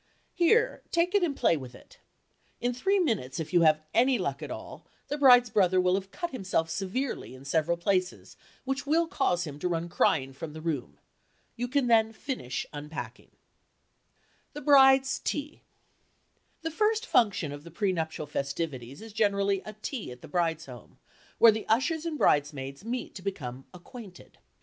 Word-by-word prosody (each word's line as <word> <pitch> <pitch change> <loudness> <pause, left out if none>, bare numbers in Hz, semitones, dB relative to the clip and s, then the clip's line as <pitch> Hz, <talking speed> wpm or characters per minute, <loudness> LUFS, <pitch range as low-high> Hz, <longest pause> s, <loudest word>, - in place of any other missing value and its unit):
Here—take 360 -2 +2
it 405 - +4
and 320 -6 0
play 170 - +3
with 130 -4 -8
it." - - -18 0.6
In 245 +1 0
three 385 +12 +1
minutes, 215 - -1
if 160 +2 -5
you 175 - +5
have 155 -1 +4
any 250 +2 +4
luck 180 -9 -3
at - - -6
all, - - -8 0.3
the 290 - -2
bride's 245 -4 +7
brother 185 -4 +3
will 180 0 +3
have 190 0 -2
cut 345 - -5
himself 185 -8 -1
severely 200 - -3
in 130 +1 -14
several 160 +4 +1
places 185 +1 -1 0.3
which 270 +1 -3
will 330 +3 +3
cause 270 - 0
him 145 -3 -7
to 180 - -1
run 170 -1 -2
crying 135 -5 +1
from 150 +3 -7
the 160 - -8
room. 155 -6 -4 0.6
You 245 +1 -3
can 275 +1 +1
then 225 -2 +3
finish 220 - -4
unpacking. 150 +2 -7 1.2
THE 295 - -7
BRIDE'S 270 -2 +5
TEA 295 +1 -4 1.0
The 325 - -2
first 430 +6 +1
function 205 - +2
of 145 0 -8
the 170 - -11
pre 190 +3 0
nuptial 160 -2 -3
festivities 140 - -4
is 225 -2 -11
generally 200 -2 +1
a 215 - -6
tea 245 - -4
at 125 0 -12
the - - -9
bride's 165 -1 -1
home, 125 -4 -13 0.4
where 230 - +8
the 220 0 -5
ushers 305 +8 +1
and 315 -2 -3
bridesmaids 140 - 0
meet 245 +3 -4
to 190 - -9
become 135 -10 -5
"acquainted." 185 +1 -13
195 Hz, 170 wpm, -28 LUFS, -, 1.2 s, where